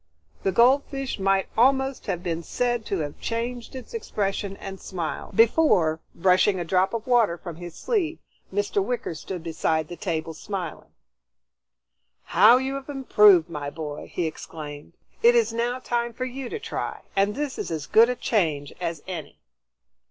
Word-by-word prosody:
The 195 - +1
goldfish 270 +2 +2
might 195 0 +2
almost 265 +3 +2
have 175 0 -2
been 170 -2 -2
said 240 +5 -1
to 195 -4 -1
have 145 -1 -5
changed 235 +2 -3
its 260 - -9
expression 200 - -2
and 195 -1 -8
smiled, 175 +1 -5
before, 215 - +4 0.2
brushing 185 +2 +3
a 175 - -3
drop 190 +5 +2
of 230 - -4
water 235 -8 +3
from 170 -1 -8
his 175 -1 -8
sleeve, 345 -9 -1 0.3
Mr. 200 0 0
Wicker 240 -4 -3
stood 170 +2 -6
beside 160 -1 -1
the 175 - -6
table 165 -3 -3
smiling. 180 0 -6 1.3
"How 240 - +6
you 265 +1 -2
have 275 +1 -6
improved, 210 - +5
my 150 -4 -5
boy!" 150 -1 -7
he 175 - -1
exclaimed. 150 -1 -7 0.3
"It 240 +1 +6
is 230 -1 +3
now 240 +2 0
time 240 -2 -2
for 255 +3 -3
you 255 0 -5
to - - -3
try, - - -4
and 200 +1 +2
this 290 -1 -3
is - - -3
as 160 -3 -3
good 230 +7 +6
a 250 - 0
change 155 - 0
as 165 -4 -3
any." 170 -5 -6
195 Hz, 165 wpm, -25 LUFS, 170-245 Hz, 1.3 s, How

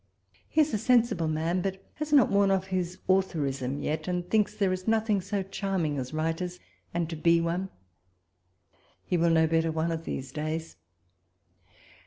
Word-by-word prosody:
He 315 - +3
is 300 -3 +1
a 215 - +1
sensible 230 -8 +3
man, 160 +3 0
but 190 0 -3
has 305 0 -5
not 275 -7 +5
worn 200 0 +4
off 190 -1 +1
his 185 -2 -2
authorism 145 -8 0
yet, 155 +4 -2
and 180 -1 -2
thinks 210 +1 +1
there 195 -3 +1
is 185 +2 -5
nothing 220 -2 +2
so 200 +1 -2
charming 185 -6 -2
as 130 -1 -5
writers, 165 +3 -2 0.3
and 170 -1 -1
to 165 - -5
be 170 +2 +4
one. 170 +3 -1 1.4
He - - 0
will 170 0 +3
know 160 -1 +4
better 165 0 +1
one 160 +1 -1
of 165 0 -4
these 130 -1 -5
days. 155 +2 -4
175 Hz, 170 wpm, -28 LUFS, 160-195 Hz, 1.4 s, not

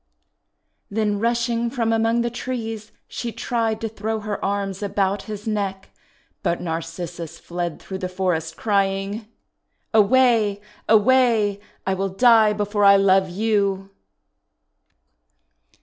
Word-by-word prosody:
Then 210 -1 0
rushing 235 +1 0
from 230 -2 0
among 225 +1 +2
the 235 0 -1
trees 225 -3 -5 0.2
she 235 - -5
tried 225 -2 -1
to 225 - -1
throw 220 0 -3
her 210 -1 -4
arms 195 0 -2
about 200 -1 0
his 210 -1 -6
neck, 200 -3 -3 0.5
but 170 - 0
Narcissus 165 0 -5
fled 175 -1 -4
through 190 -1 -7
the 185 - -3
forest, 175 -4 -2
crying: 200 +1 -1 0.2
— - - -54
" - - -48
Away! 220 -2 +4 0.3
away! 220 -2 +4 0.3
I 190 - +1
will 195 +1 -1
die 220 +1 +5
before 205 0 -1
I 200 0 +8
love 190 -1 +4
you 195 -1 0
205 Hz, 125 wpm, -22 LUFS, 195-225 Hz, 0.5 s, I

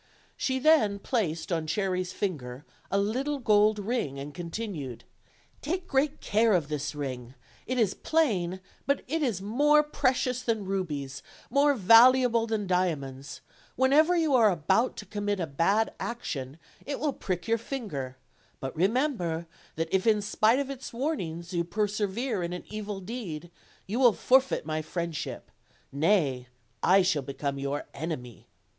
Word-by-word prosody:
She 260 -1 -1
then 260 -8 +4
placed 195 - -2
on 165 -2 -1
Cherry's 185 +1 -2
ringer 140 -9 -3 0.2
a 195 - +1
little 255 +9 0
gold 215 -3 +4
ring, 205 - -2
and 140 +1 -7
continued: 170 - -5 0.6
"Take 360 +3 -3
great 275 +1 0
care 220 +1 +3
of 165 -5 +1
this 145 -2 -3
ring; 130 -3 -5 0.3
it 255 - -1
is 215 -5 +2
plain, 190 - 0 0.3
but 280 -1 +1
it 320 +5 -1
is 225 -10 -1
more 295 +8 +4
precious 255 -3 0
than 220 -5 -1
rubies, 150 -8 -3 0.3
more 285 +2 +4
valuable 230 +2 +6
than 220 -2 -1
dia 180 -2 +2
monds; 135 -1 -9 0.3
whenever 295 +7 +4
you 320 -4 +2
are 230 -4 +6
about 190 - +1
to - - -7
commit 205 -1 -2
a 170 - 0
bad 180 +10 +1
action 145 - -4 0.3
it 280 - -4
will 295 -2 0
prick 180 -5 -4
your 230 0 +2
finger; 155 - -5 0.4
but 135 -1 -5
remember 190 - 0 0.3
that 165 +1 -3
if 190 +3 +2
in 210 -2 +4
spite 215 +3 +3
of 275 0 -2
its 270 -1 -7
warning 230 - -3
you 170 -2 0
persevere 210 +4 -1
in 170 0 -3
an 180 - -6
evil 210 -2 -5
deed, 180 -6 -6 0.3
you 220 +6 -2
will 245 -4 +6
for 260 +5 +5
feit 265 - -4
my 155 0 -2
friendship; 170 0 -5 0.4
nay, 140 -5 +1 0.3
I 190 +1 +5
shall 180 -5 +1
become 140 +1 -4
your 140 +1 -3
enemy." 135 -6 -6
200 Hz, 155 wpm, -28 LUFS, 160-245 Hz, 0.6 s, valuable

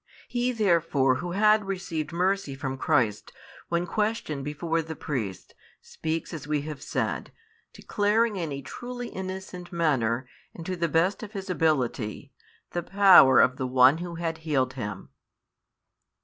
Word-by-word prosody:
He 245 +1 0
therefore 165 - +2
who 175 +3 -5
had 215 +1 +4
received 170 -5 -4
mercy 180 -4 0
from 135 0 -4
Christ, 130 -7 0 0.4
when 170 +1 0
questioned 210 -8 -2
before 165 +3 -1
the 160 0 -7
priests, 115 -12 -5 0.3
speaks 160 +1 -4
as 150 -3 -7
we 150 -1 0
have 150 -2 -7
said, - - -3 0.4
declaring 215 +1 +1
in 165 -5 -3
a 140 0 -5
truly 245 - -7
innocent 185 -1 -7
manner, 130 -8 0 0.3
and 165 - -8
to 185 - -2
the 170 -1 -1
best 175 +5 +1
of 215 -1 -8
his 195 -2 -5
ability, 135 -10 -1 0.4
the 175 - -2
power 190 -8 +7
of 130 0 +4
the 130 - -2
One 130 +4 +5
Who 175 -1 -6
had 165 -1 -3
healed 145 -5 0
him. 105 -6 -6
165 Hz, 150 wpm, -27 LUFS, 135-190 Hz, 0.4 s, power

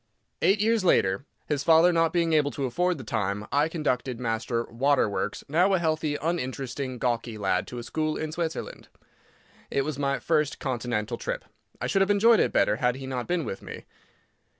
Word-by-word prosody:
Eight 200 +2 +4
years 220 0 +2
later, 100 - +2 0.2
his 145 -2 -1
father 165 +3 +6
not 165 -1 +3
being 170 -2 +1
able 150 -2 +3
to 140 - -2
afford 180 +7 0
the 130 - -8
time, 105 -2 -2
I 145 +4 +3
conducted 130 -6 -2
Master 115 0 -1
"Waterworks," 120 -5 0
now 180 +6 +3
a - - +3
healthy, 155 -3 0
uninteresting, 135 -5 -3
gawky 120 -2 -2
lad, 95 -3 0
to 125 - -7
a 120 - -5
school 155 +4 -2
in 155 -1 -3
Switzerland. 165 0 -4 0.8
It 135 - 0
was 150 -2 -4
my 140 -1 +1
first 150 -3 0
Continental 120 -5 -2
trip. - - -4 0.3
I - - -3
should 195 - +1
have 195 - +3
enjoyed 215 +3 +5
it - - +2
better 105 +2 +2
had 125 0 +1
he 135 0 -7
not 130 -2 -4
been 175 -4 0
with 95 - -5
me. - - -9
140 Hz, 185 wpm, -27 LUFS, 120-165 Hz, 0.8 s, father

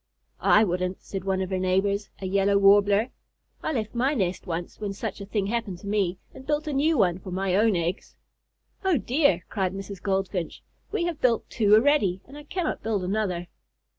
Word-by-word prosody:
"I 215 - +5
wouldn't," 185 -1 -2
said 195 -2 -6
one 190 -1 0
of 185 - -6
her 190 - 0
neighbors, 195 +2 0
a 195 - -5
Yellow 200 +1 +2
Warbler. 200 +3 +4 0.5
"I - - -2
left 225 -7 -2
my 260 +5 +1
nest 190 -4 -2
once 170 0 -4
when 205 -2 -3
such 205 0 -5
a 200 - -7
thing 205 -1 -1
happened 215 -3 -2
to 200 - -9
me, 200 -3 0 0.2
and 265 - -11
built 295 +2 -1
a 300 - -3
new 300 +3 +2
one 180 -4 +2
for 185 - -9
my 185 0 -1
own 215 0 +3
eggs." 170 +3 -3 0.7
"Oh 375 -5 +3
dear!" 245 - +2
cried 190 -3 -1
Mrs. 195 -1 -7
Goldfinch, 190 -3 -2 0.3
"we 415 -4 0
have 340 -3 -3
built 235 -3 +2
two 210 -2 +4
already, 220 -7 +3
and 275 - -14
I 295 0 -10
cannot 350 0 -2
build 215 -4 -1
another." 185 -2 -1
200 Hz, 195 wpm, -26 LUFS, 185-235 Hz, 0.7 s, I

